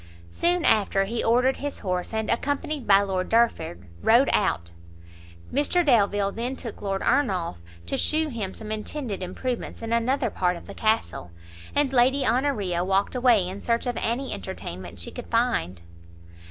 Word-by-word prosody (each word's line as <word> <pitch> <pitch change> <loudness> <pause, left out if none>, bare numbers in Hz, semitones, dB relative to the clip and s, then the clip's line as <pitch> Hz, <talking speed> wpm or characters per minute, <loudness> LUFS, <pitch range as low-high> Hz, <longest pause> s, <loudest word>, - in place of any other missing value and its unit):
Soon 350 - +2
after, 200 -3 +3
he 225 +4 -2
ordered 250 +3 +3
his 290 0 -4
horse, 180 -2 -3
and, 220 -1 -2
accompanied 285 +2 -1
by 200 0 +6
Lord 190 -2 -2
Derford, 225 - +1 0.2
rode 240 +5 +5
out. 85 - +1 0.8
Mr 295 +6 +2
Delvile 205 -6 +3
then 240 +5 -3
took 235 -4 -7
Lord 195 -1 -2
Ernolf 185 - +1 0.3
to 85 - -2
shew 310 0 +1
him 215 -7 -4
some 215 -1 -7
intended 215 -1 -4
improvements 230 +7 -4
in 225 0 -2
another 240 +1 +1
part 180 -1 0
of - - -12
the - - -9
castle, 220 - -1 0.5
and 285 -2 +2
Lady 260 +2 +3
Honoria 215 -11 +1
walked 195 +2 +1
away 240 -7 +3
in 190 +2 -6
search 235 +1 0
of 245 -1 -2
any 250 +4 -1
entertainment 95 - -7
she 85 - -6
could - - -8
find. 85 +1 0
225 Hz, 160 wpm, -25 LUFS, 190-260 Hz, 0.8 s, by